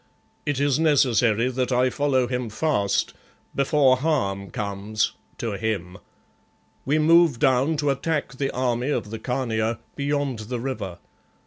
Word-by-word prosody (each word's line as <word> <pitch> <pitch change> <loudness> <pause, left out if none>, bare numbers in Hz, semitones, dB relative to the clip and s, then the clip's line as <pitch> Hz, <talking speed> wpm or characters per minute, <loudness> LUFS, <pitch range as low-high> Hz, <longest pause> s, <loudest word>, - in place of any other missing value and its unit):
It 145 -2 0
is 145 0 +2
necessary 125 -6 +3
that 130 0 -1
I 125 +1 +3
follow 135 -3 +1
him 125 -1 -3
fast, 110 -4 0 0.4
before 140 -1 +3
harm 100 - -1
comes 100 +2 -2 0.3
to 115 - -3
him. 100 -3 -3 0.9
We 145 +3 +2
move 165 -2 +5
down 135 +4 +2
to 145 -1 +1
attack 145 +2 -2
the 135 0 -1
army 125 +1 -1
of 110 -7 -2
the 115 - -5
Khania 115 -2 -1 0.2
beyond 140 -3 -1
the 125 -2 -2
river. 110 -8 -4
125 Hz, 135 wpm, -24 LUFS, 110-145 Hz, 0.9 s, move